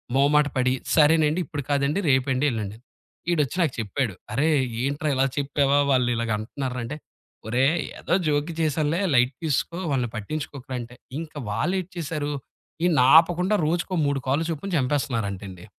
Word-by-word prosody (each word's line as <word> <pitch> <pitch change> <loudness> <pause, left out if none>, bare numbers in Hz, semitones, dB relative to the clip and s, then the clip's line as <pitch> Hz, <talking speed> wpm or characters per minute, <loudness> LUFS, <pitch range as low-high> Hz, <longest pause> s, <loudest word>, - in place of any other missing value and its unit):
మొహమాట 145 +2 +4
పడి 130 0 +2 0.2
సరేనండి 155 +1 +4
ఇప్పుడు 145 0 -5
కాదండి 145 +5 +1
రేపండి 130 +1 +2
వెళ్ళండి. 110 -3 -4 0.5
ఈడొచ్చి 150 -2 +1
నాకు 155 -6 +1
చెప్పాడు. 115 +1 -1 0.2
"అరేయ్ 150 +6 +3 0.3
ఏంట్రా 145 +3 -1
ఇలా 130 +1 +3
చెప్పావా 140 0 +2
వాళ్ళు 125 -2 +3
ఇలాగ 115 -1 -2
అంటున్నారు 130 +4 -4
రా" 125 - -2
అంటే, 145 +6 -5 0.5
ఒరేయ్ 135 +8 +2 0.2
ఏదో - - +1
జోక్‌గా 150 +2 0
చేశానులే 155 +2 +1 0.2
లైట్ 125 +2 +4
తీసుకో 160 +3 -1
వాళ్ళని 125 -4 0
పట్టించుకోకురా 135 +3 -5
అంటే. 120 +1 -11 0.2
ఇంకా 155 -2 -7
వాళ్ళేటి 180 - -1
చేసారు. 150 -2 -3 0.5
ఈడి‌ని 165 -7 +4 0.2
ఆపకుండా 180 +5 +3
రోజుకో 175 +3 -1
3 140 -1 0
కాల్లు 145 +5 +1
చొప్పున 165 +5 -5
చంపేస్తున్నారంటండి. 105 -9 -2
140 Hz, 145 wpm, -24 LUFS, 125-155 Hz, 0.5 s, మొహమాట